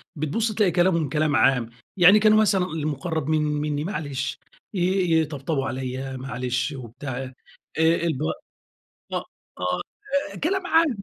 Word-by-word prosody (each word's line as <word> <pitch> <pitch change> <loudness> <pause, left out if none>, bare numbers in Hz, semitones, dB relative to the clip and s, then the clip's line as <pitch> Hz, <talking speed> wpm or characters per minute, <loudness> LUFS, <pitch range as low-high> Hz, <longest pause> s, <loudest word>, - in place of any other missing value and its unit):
بتبُص 160 +10 -1
تلاقي 205 -4 +3
كلامهم 170 -3 +2
كلام 150 0 +1
عام. 125 -4 +3 0.3
يعني 185 +3 +8
كان 215 0 +5
مثلًا 210 -4 +4
المُقرّب 155 -1 -3
من 155 -1 +2
منّي 150 -1 -1
معلش. 145 -7 -3 0.3
ي 195 - -2 0.4
يطبطبوا 145 -2 -2
عليّا 130 +1 -4
معلش 125 +1 -2
وبتاع. 130 +1 -7
آآ 130 0 -8 0.5
الب 160 -3 +2 0.9
أ - - 0
أ - - 0 1.1
آآ 200 - -10
كلام 370 +3 0
عام 320 - +3
155 Hz, 130 wpm, -24 LUFS, 135-185 Hz, 1.1 s, يعني